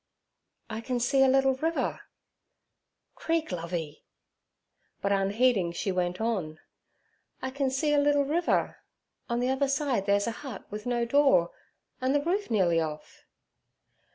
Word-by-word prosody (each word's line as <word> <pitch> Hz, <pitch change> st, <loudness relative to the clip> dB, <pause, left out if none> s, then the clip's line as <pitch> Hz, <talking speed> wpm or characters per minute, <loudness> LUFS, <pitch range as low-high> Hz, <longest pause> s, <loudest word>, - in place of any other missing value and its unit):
'I 220 Hz, +1 st, -4 dB
can 245 Hz, +1 st, -2 dB
see 270 Hz, +3 st, +2 dB
a 270 Hz, -, +6 dB
little 270 Hz, 0 st, +4 dB
river.' 320 Hz, +5 st, -2 dB, 1.1 s
'Creek, 325 Hz, -4 st, -1 dB
Lovey.' 165 Hz, -3 st, -5 dB, 1.0 s
But, 200 Hz, -, -1 dB
unheeding, 200 Hz, -1 st, +2 dB
she 195 Hz, +3 st, -2 dB
went 180 Hz, -1 st, -1 dB
on: 190 Hz, -9 st, -2 dB, 0.8 s
'I 260 Hz, -, -2 dB
can 275 Hz, 0 st, 0 dB
see 295 Hz, +3 st, 0 dB
a 290 Hz, -, +4 dB
little 285 Hz, 0 st, +3 dB
river. 335 Hz, +5 st, 0 dB, 0.5 s
On 235 Hz, 0 st, 0 dB
the 250 Hz, +1 st, 0 dB
other 265 Hz, +1 st, +1 dB
side 270 Hz, -7 st, 0 dB
there's 200 Hz, 0 st, +3 dB
a 230 Hz, -, -1 dB
hut 265 Hz, -8 st, -8 dB
with 210 Hz, +3 st, -6 dB
no 240 Hz, -1 st, 0 dB
door, 270 Hz, -9 st, +4 dB, 0.5 s
and 260 Hz, +2 st, +1 dB
the 290 Hz, -, +3 dB
roof 385 Hz, +6 st, -1 dB
nearly 180 Hz, -7 st, +2 dB
off.' 155 Hz, -1 st, -7 dB
245 Hz, 145 wpm, -28 LUFS, 195-275 Hz, 1.1 s, a